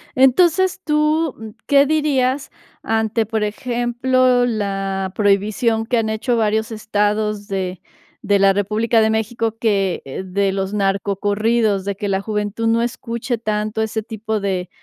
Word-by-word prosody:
Entonces, 345 +9 +3
tú, 305 0 +1
mm, 220 0 -8 0.2
¿qué 280 0 +5
dirías 280 -3 0 0.3
ante, 220 0 0
por 220 0 -2
ejemplo, 245 +3 +1
la 195 -4 -2
prohibición 215 +3 +1
que 240 +1 0
han 220 -1 0
hecho 230 +2 -1
varios 220 +1 0
estados 210 -1 -1
de 185 -2 -3 0.4
de 205 -1 +2
la 195 0 +5
República 215 +4 +1
de 220 0 +3
México 225 0 -1
que, 200 -5 0
eh, 135 +7 -6
de 195 +1 0
los 195 +1 -3
narcocorridos, 200 +1 0
de 200 -1 -2
que 205 - -4
la 190 - +1
juventud 210 +2 -2
no 230 +1 +2
escuche 235 0 -3
tanto 215 0 -2
ese 220 0 -2
tipo 220 0 -3
de 190 -3 -2
220 Hz, 145 wpm, -19 LUFS, 200-240 Hz, 0.4 s, qué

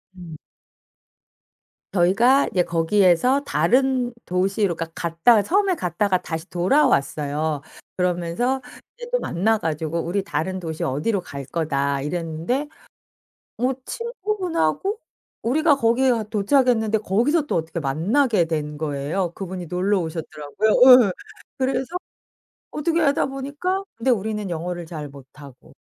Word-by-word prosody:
음. 170 -4 -10 1.6
저희가 205 +10 +4
이제 180 - +2
거기에서 185 +9 +3
다른 250 - +1
도시로 190 +1 0
그러니까 165 0 -5
갔다가 170 +7 +3
처음에 380 - +1
갔다가 185 - 0
다시 160 +2 -6
돌아왔어요. 155 - +1 0.3
그러면서 180 +9 -1 0.4
이제 480 0 -8
또 - - +2
만나 220 - +1
가지고 160 -3 -2
"우리 190 +4 -1
다른 185 +3 -3
도시 160 -3 -5
어디로 170 +10 -1
갈 140 -4 -8
거다." 140 -2 -1
이랬는데 170 - -2 0.9
어 255 +2 +1
친구분하고 400 - -2 0.4
우리가 295 +5 +3
거기에 255 0 +2
가 230 -2 0
도착했는데 220 +1 +2
거기서 245 - +1
또 - - -1
어떻게 165 +1 -2
만나게 180 - +1
된 150 -2 -3
거예요. 155 +4 -2
그분이 185 -1 -6
놀러 185 +4 0
오셨더라고요. 160 +3 -3 0.4
예. - - -1 0.5
그래서 265 +4 -1 0.8
어떻게 330 +3 0
하다 285 -3 +2
보니까 290 +8 -3
근데 230 +3 0
우리는 210 -2 -1
영어를 175 0 -4
잘 155 -3 -7
못하고. 140 -1 -15
190 Hz, 300 characters per minute, -22 LUFS, 160-255 Hz, 1.6 s, 저희가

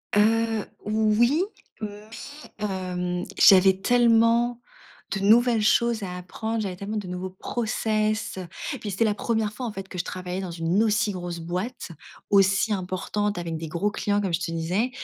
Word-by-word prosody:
Heu, 225 +1 +2 0.2
oui, 220 +7 +3 0.4
mais 210 0 -7 0.5
hem, 180 -3 -2
j'avais 190 -2 +7
tellement 235 +1 +3 0.5
de 195 - -1
nouvelles 225 +3 +4
choses 230 +1 +2
à 180 -2 -5
apprendre, 220 +5 -4
j'avais 190 -3 -3
tellement 200 +4 -5
de 205 -3 -4
nouveaux 180 +1 -4
process, 215 +1 -1
heu, 180 - -6 0.3
puis 210 - -5
c'était 195 +3 0
la 210 - +2
1ere 220 0 -1
fois, 250 +3 -5
en - - -4
fait, 195 -2 -7
que 185 - -7
je - - 0
travaillais 180 +1 -5
dans 185 - -5
une 170 +4 0
aussi 215 -1 +2
grosse 175 -2 -5
boîte, 180 +7 -4 0.4
aussi 195 +2 +4
importante, 195 +2 -2
avec 170 -2 -3
des 160 0 -6
gros 175 +6 -1
clients, 205 0 0
comme 195 -4 -2
je 165 - +2
te - - -3
disais, 175 +9 0
205 Hz, 170 wpm, -25 LUFS, 185-220 Hz, 0.5 s, j'avais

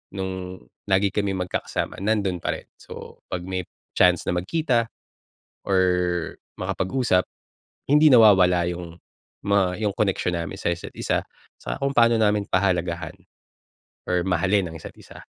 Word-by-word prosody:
nung 95 -1 -5 0.3
lagi 95 +1 +3
kaming 100 -3 -1
magkakasama - - -3
nando'n 100 -3 0
pa - - -2
rin. - - -11
So, - - -11
'pag 90 -1 -4
may 95 -1 -4 0.3
chance 90 -1 +4
na - - +2
magkita 120 - 0 0.8
or 95 -1 +3 0.8
makapag-usap, 95 -2 0 0.6
hindi 150 +2 +6
nawawala 95 -8 +6
yung 85 -1 -8 0.5
mga 100 -3 +2
yung 100 - 0
connection 95 -4 0
namin 85 -3 -4
sa 85 - 0
isa't 85 - -8
isa - - 0 0.4
sa - - -4
kung 140 0 -1
paano 115 -2 +4
namin 105 -2 +1
pahalagahan 85 -3 0 0.9
or 90 0 0
mahalin 95 +2 +1
ang 80 - -10
isa't 80 - -10
isa. - - -14
95 Hz, 135 wpm, -24 LUFS, 90-105 Hz, 0.9 s, hindi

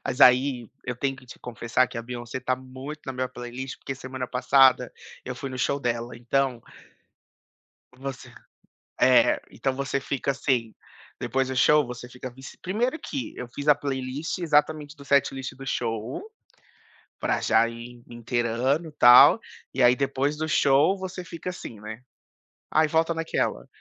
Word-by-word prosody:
Mas, 125 - -3
aí, 125 -2 +5 0.2
eu 125 -1 -4
tenho 135 0 -1
que 130 - -16
te - - -12
confessar 125 +1 0
que 120 - -10
a - - -4
Beyoncé 120 +1 -6
tá 130 0 0
muito 130 +4 -9
na 135 - -3
minha 130 0 -2
playlist, 125 +2 -7
porque 135 - -5
semana 130 -1 -6
passada 130 0 +4 0.3
eu 125 - -5
fui 135 +2 -6
no 130 - -6
show 140 +2 +1
dela, 120 -1 -2
então 125 0 0 1.3
Você 135 -1 -7 0.7
é, - - +5
então 135 -1 -2
você 140 0 -1
fica, 140 0 -2
assim 125 -5 -1 0.5
depois 130 0 0
do 130 - -4
show, 150 +2 +5
você 125 0 -8
fica 125 +1 -8
vici 130 +1 -12
1º 235 - -1
que 270 - -5
eu 125 - -5
fiz 145 +1 -6
a 150 - +7
playlist 135 +3 -3
exatamente 150 -2 +1
do 140 -1 -14
setlist 135 -2 +1
do 135 +1 -10
show, 115 - -3 1.0
pra - - 0
já 115 +1 +4
ir 120 +1 -10
inteirando 120 +6 -1
e - - -15
tal. 135 - +8 0.3
E 130 - -1
aí 125 +1 +6
depois 140 +2 0
do 155 0 -2
show, 145 +8 +4
você 185 -1 -6
fica 170 +2 -6
assim, 115 - -8
né, 110 +3 -8 0.7
"aí 155 0 +3
volta 165 +1 +2
naquela", 160 - -2
130 Hz, 165 wpm, -26 LUFS, 125-140 Hz, 1.3 s, tal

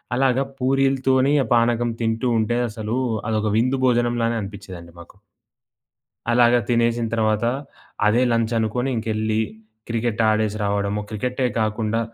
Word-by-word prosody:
అలాగా 130 +1 +2 0.2
పూరీలతోని, 135 +1 +2
ఆ - - -5
పానకం 120 0 +2
తింటూ 115 +2 0
ఉంటే 120 +2 0
అసలు, 110 +2 -4 0.3
అదొక 110 -1 0
విందు 130 +4 +1
భోజనంలానే 120 -1 +1
అనిపించేదండి 95 -4 -9
మాకు. 85 +3 -15 1.2
అలాగ 120 0 +5
తినేసిన 115 -1 +1
తర్వాత, 110 -1 +1 0.6
అదే 115 +4 +3
లంచనుకుని 115 +2 0
ఇంకెళ్ళి 110 -1 -1 0.5
క్రికెట్ 115 -1 -1
ఆడేసి 110 -1 +1
రావడము, 100 0 -1
క్రికెటే 125 +5 -2
కాకుండా 110 +1 0
115 Hz, 115 wpm, -22 LUFS, 110-120 Hz, 1.2 s, అలాగ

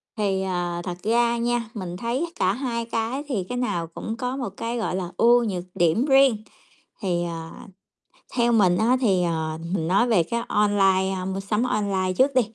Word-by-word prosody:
Thì, 200 -4 0
ờ, 175 -2 -2
thật 175 -1 -5
ra 235 +2 +2
nha, 235 -1 -1
mình 185 -5 -5
thấy 240 - -1
cả 185 - +2
hai 235 -2 -3
cái 230 +4 -2
thì 230 -10 -1
cái 250 - -3
nào 175 -10 -1
cũng 220 +7 -6
có 250 +2 -2
một 250 -6 -3
cái, 230 +1 -3
gọi 220 -5 -2
là, 180 -2 -4
ưu 240 +1 +5
nhược 190 -6 -2
điểm 175 +9 +2
riêng. 270 -6 +4 0.6
Thì, 175 -4 0
ờ, 165 -1 -5 0.8
theo 240 -1 +2
mình 190 -6 +4
á 235 +5 +3
thì, 190 -7 +3
ờ, 160 -2 -2 0.2
mình 165 -4 -1
nói 195 +7 +3
về 210 -8 +3
cái 235 +8 -2
online, 195 -2 +2
a, 185 -1 -4
mua 190 +1 -3
sắm 210 +3 -1
online 200 -5 0
trước 275 +2 +4
đi. 255 - +6
210 Hz, 195 wpm, -24 LUFS, 185-235 Hz, 0.8 s, đi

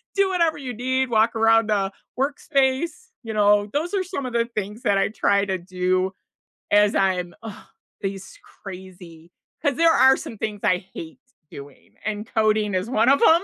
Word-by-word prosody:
do 395 -1 +3
whatever 335 -5 +1
you 250 -4 -6
need, 260 +2 -1
walk 225 0 +2
around 225 -1 +3
a 195 -1 +1 0.3
workspace, 280 +4 0 0.2
you 225 -1 -5
know, 205 -1 +4
those 335 +7 -1
are 380 - +1
some 330 -8 -5
of 245 - -7
the 235 0 +1
things 210 +3 -5
that 200 - +2
I - - +2
try 200 -2 +1
to 190 -1 -2
do 185 +1 -1 0.6
as 205 0 +4
I'm 180 -2 0
ugh, 220 -2 -9 0.3
these 195 -1 -6 0.2
crazy 180 -3 -11 0.3
'cause 285 -4 +1
there 330 0 +4
are 265 0 +6
some 225 - -8
things 210 -2 -4
I 180 0 +1
hate 160 -1 -9 0.3
doing, 140 0 -13
and 215 0 -3
coding 215 -2 +2
is 185 +5 -2
1 240 0 +3
of 280 - +4
'em. 335 +2 +6
215 Hz, 180 wpm, -23 LUFS, 195-265 Hz, 0.6 s, are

